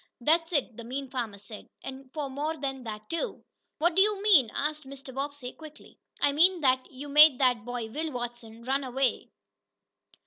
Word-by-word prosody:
"That's 325 Hz, +6 st, +2 dB
it," 270 Hz, -8 st, -1 dB
the 235 Hz, -, -7 dB
mean 260 Hz, +2 st, -5 dB
farmer 235 Hz, -6 st, -3 dB
said. 205 Hz, +1 st, -11 dB
"And 265 Hz, 0 st, -9 dB
for 295 Hz, -1 st, -3 dB
more 295 Hz, +4 st, -3 dB
than 270 Hz, -2 st, -4 dB
that, 215 Hz, -1 st, -7 dB
too." 335 Hz, -, -3 dB, 0.3 s
"What 340 Hz, +1 st, +2 dB
do 385 Hz, -, +5 dB
you 415 Hz, 0 st, +3 dB
mean?" 330 Hz, -, +6 dB
asked 300 Hz, +1 st, -2 dB
Mr. 270 Hz, -1 st, -10 dB
Bobbsey 275 Hz, -1 st, -5 dB
quickly. 310 Hz, -1 st, -14 dB, 0.2 s
"I 285 Hz, -, +3 dB
mean 345 Hz, +4 st, +4 dB
that 260 Hz, -2 st, +2 dB
you 270 Hz, +3 st, -8 dB
made 300 Hz, -1 st, +7 dB
that 250 Hz, -5 st, +2 dB
boy, 245 Hz, -2 st, -4 dB
Will 315 Hz, +4 st, -3 dB
Watson, 240 Hz, -2 st, -7 dB
run 270 Hz, +3 st, 0 dB
away." 260 Hz, 0 st, -1 dB
270 Hz, 180 wpm, -28 LUFS, 245-305 Hz, 0.3 s, made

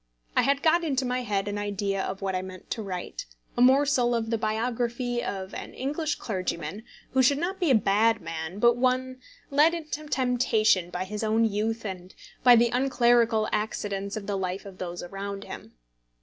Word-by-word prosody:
I -, -, +5 dB
had 280 Hz, +1 st, +1 dB
got 340 Hz, +2 st, +4 dB
into 270 Hz, -5 st, 0 dB
my 250 Hz, 0 st, -1 dB
head 205 Hz, -4 st, -1 dB
an 205 Hz, 0 st, -2 dB
idea 200 Hz, -1 st, -2 dB
of 195 Hz, -, -4 dB
what 190 Hz, -1 st, -1 dB
I 185 Hz, -, -1 dB
meant 185 Hz, -1 st, -10 dB
to 225 Hz, -, -2 dB
write, 195 Hz, -, -5 dB, 0.3 s
a 240 Hz, -, 0 dB
morsel 260 Hz, -1 st, +4 dB
of 225 Hz, -1 st, -2 dB
the 230 Hz, -, +2 dB
biography 240 Hz, +2 st, -1 dB
of 190 Hz, 0 st, -5 dB
an -, -, -7 dB
English 295 Hz, +4 st, -2 dB
clergyman 185 Hz, -2 st, -4 dB, 0.3 s
who 265 Hz, -, +3 dB
should 275 Hz, +2 st, +4 dB
not 365 Hz, +5 st, -2 dB
be 350 Hz, -5 st, +1 dB
a 260 Hz, -, +6 dB
bad 220 Hz, +2 st, +3 dB
man, 160 Hz, +2 st, -6 dB
but 235 Hz, +2 st, +4 dB
one 255 Hz, +1 st, 0 dB, 0.3 s
led 300 Hz, +4 st, +5 dB
into 305 Hz, -2 st, -6 dB
temptation 235 Hz, -9 st, +2 dB
by 180 Hz, +1 st, -3 dB
his 210 Hz, +3 st, -5 dB
own 220 Hz, +1 st, +3 dB
youth 220 Hz, +2 st, -1 dB
and 185 Hz, -2 st, -7 dB, 0.3 s
by 245 Hz, -1 st, +8 dB
the 235 Hz, 0 st, +4 dB
unclerical 240 Hz, -3 st, +3 dB
accidents 205 Hz, -1 st, -2 dB
of 205 Hz, -, -6 dB
the 200 Hz, -1 st, -2 dB
life 185 Hz, +1 st, -3 dB
of 195 Hz, -2 st, -11 dB
those 175 Hz, -1 st, -5 dB
around 195 Hz, +2 st, -6 dB
him. -, -, -10 dB
225 Hz, 190 wpm, -27 LUFS, 195-255 Hz, 0.3 s, by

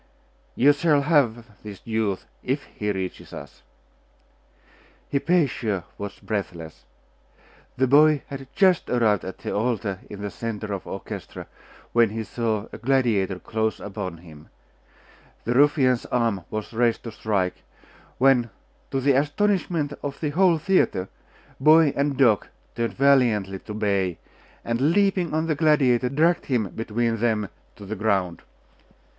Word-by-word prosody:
'You 145 Hz, +4 st, +5 dB
shall 145 Hz, -1 st, +2 dB
have 120 Hz, -8 st, +1 dB
this 105 Hz, -3 st, -9 dB
youth, 110 Hz, -4 st, -1 dB, 0.2 s
if 135 Hz, +3 st, -2 dB
he 105 Hz, 0 st, -4 dB
reaches 95 Hz, -2 st, -5 dB
us.' -, -, -10 dB, 1.5 s
Hypatia 140 Hz, -, +1 dB, 0.2 s
watched 100 Hz, -1 st, -7 dB
breathless. 85 Hz, -6 st, -5 dB, 0.9 s
The 130 Hz, -, +3 dB
boy 150 Hz, +2 st, +5 dB
had 135 Hz, -1 st, -8 dB
just 185 Hz, -3 st, +3 dB
arrived 110 Hz, -5 st, +2 dB
at 95 Hz, -, -7 dB
the -, -, -5 dB
altar 105 Hz, -3 st, -1 dB
in 100 Hz, 0 st, -8 dB
the 100 Hz, -, -4 dB
centre 110 Hz, -2 st, -5 dB
of 95 Hz, -, -5 dB
the -, -, -9 dB
orchestra, 95 Hz, -, -7 dB, 0.5 s
when 115 Hz, -2 st, +4 dB
he 110 Hz, +1 st, -4 dB
saw 110 Hz, -2 st, -2 dB
a -, -, -8 dB
gladiator 115 Hz, -7 st, +1 dB
close 110 Hz, +3 st, -2 dB
upon 95 Hz, -4 st, -6 dB
him. 80 Hz, -3 st, -15 dB, 0.9 s
The 120 Hz, -, -1 dB
ruffian's 135 Hz, -2 st, +3 dB
arm 115 Hz, -7 st, 0 dB
was 110 Hz, +2 st, -5 dB
raised 115 Hz, 0 st, +1 dB
to 115 Hz, -, -6 dB
strike, 100 Hz, -4 st, -2 dB, 0.6 s
when, 125 Hz, -2 st, +4 dB, 0.4 s
to 135 Hz, -1 st, -1 dB
the 140 Hz, +2 st, +3 dB
astonishment 150 Hz, +1 st, 0 dB
of 145 Hz, -1 st, -5 dB
the 150 Hz, -2 st, -2 dB
whole 175 Hz, +1 st, +4 dB
theatre, 155 Hz, -, +1 dB, 0.5 s
boy 155 Hz, +1 st, +6 dB
and 140 Hz, -1 st, 0 dB
dog 120 Hz, -8 st, +3 dB, 0.3 s
turned 115 Hz, 0 st, -2 dB
valiantly 120 Hz, -9 st, +3 dB
to 105 Hz, -, -8 dB
bay, 100 Hz, -5 st, 0 dB, 0.5 s
and 130 Hz, +7 st, +1 dB
leaping 195 Hz, -4 st, +2 dB
on 160 Hz, +1 st, 0 dB
the 160 Hz, -, +1 dB
gladiator, 140 Hz, -5 st, +3 dB
dragged 160 Hz, +6 st, +1 dB
him 115 Hz, -7 st, 0 dB
between 115 Hz, +2 st, -2 dB
them 110 Hz, -3 st, 0 dB, 0.3 s
to 100 Hz, -, -11 dB
the 110 Hz, +3 st, -4 dB
ground. 95 Hz, -5 st, 0 dB
120 Hz, 140 wpm, -24 LUFS, 105-140 Hz, 1.5 s, boy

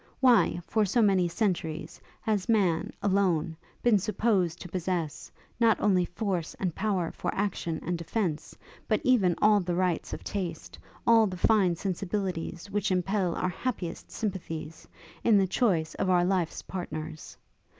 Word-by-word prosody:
Why, 245 Hz, -8 st, +4 dB
for 220 Hz, -1 st, +1 dB
so 220 Hz, +4 st, +2 dB
many 190 Hz, -4 st, +3 dB
centuries, 165 Hz, -4 st, -2 dB, 0.2 s
has 210 Hz, -3 st, -1 dB
man, 190 Hz, -7 st, +2 dB
alone, 185 Hz, -5 st, +1 dB, 0.3 s
been 230 Hz, -4 st, +5 dB
supposed 195 Hz, -4 st, 0 dB
to -, -, -6 dB
possess, 175 Hz, -3 st, -3 dB, 0.3 s
not 230 Hz, -2 st, +4 dB
only 185 Hz, -4 st, +3 dB
force 180 Hz, -3 st, -3 dB
and 180 Hz, -4 st, -2 dB
power 190 Hz, -4 st, -1 dB
for -, -, -4 dB
action 180 Hz, -5 st, -2 dB
and 175 Hz, 0 st, -1 dB
defence, 170 Hz, -3 st, -3 dB, 0.3 s
but 215 Hz, -, +2 dB
even 200 Hz, -9 st, +3 dB
all 210 Hz, 0 st, +6 dB
the 175 Hz, -2 st, -2 dB
rights 180 Hz, -2 st, 0 dB
of -, -, -6 dB
taste; 175 Hz, -5 st, -5 dB, 0.3 s
all 225 Hz, -2 st, +6 dB
the 185 Hz, -1 st, -5 dB
fine 190 Hz, -3 st, +3 dB
sensibilities 185 Hz, -1 st, -3 dB
which 205 Hz, 0 st, 0 dB
impel 185 Hz, -1 st, 0 dB
our 185 Hz, -, 0 dB
happiest 185 Hz, -3 st, -4 dB
sympathies, 165 Hz, -6 st, -5 dB, 0.4 s
in 225 Hz, -3 st, +5 dB
the 195 Hz, -, +4 dB
choice 185 Hz, -5 st, +1 dB
of 185 Hz, -, -1 dB
our 175 Hz, -1 st, +4 dB
life's 180 Hz, -3 st, -1 dB
partners? 155 Hz, -4 st, -6 dB
185 Hz, 150 wpm, -28 LUFS, 170-210 Hz, 0.4 s, all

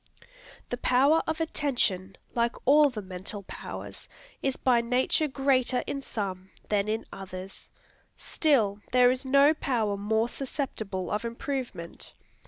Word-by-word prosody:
The 245 Hz, -, -1 dB
power 275 Hz, +6 st, +4 dB
of 315 Hz, +1 st, -1 dB
attention, 240 Hz, -, 0 dB, 0.2 s
like 235 Hz, 0 st, +1 dB
all 290 Hz, +2 st, +6 dB
the 215 Hz, -5 st, -6 dB
mental 190 Hz, +2 st, -7 dB
powers, -, -, -8 dB, 0.3 s
is 270 Hz, -1 st, -1 dB
by 245 Hz, -2 st, +3 dB
nature 255 Hz, +6 st, +2 dB
greater 265 Hz, -2 st, +1 dB
in 275 Hz, -, -3 dB
some 190 Hz, -6 st, -4 dB, 0.2 s
than 205 Hz, -1 st, +1 dB
in 220 Hz, +1 st, -2 dB
others. 190 Hz, 0 st, -9 dB, 0.5 s
Still, 225 Hz, -10 st, +2 dB
there 250 Hz, -1 st, +6 dB
is 260 Hz, +1 st, -3 dB
no 280 Hz, +3 st, +6 dB
power 230 Hz, -9 st, 0 dB
more 220 Hz, +3 st, +1 dB
susceptible 220 Hz, -, -4 dB
of 210 Hz, +2 st, -1 dB
improvement. 235 Hz, -6 st, -5 dB
240 Hz, 130 wpm, -28 LUFS, 200-275 Hz, 0.5 s, all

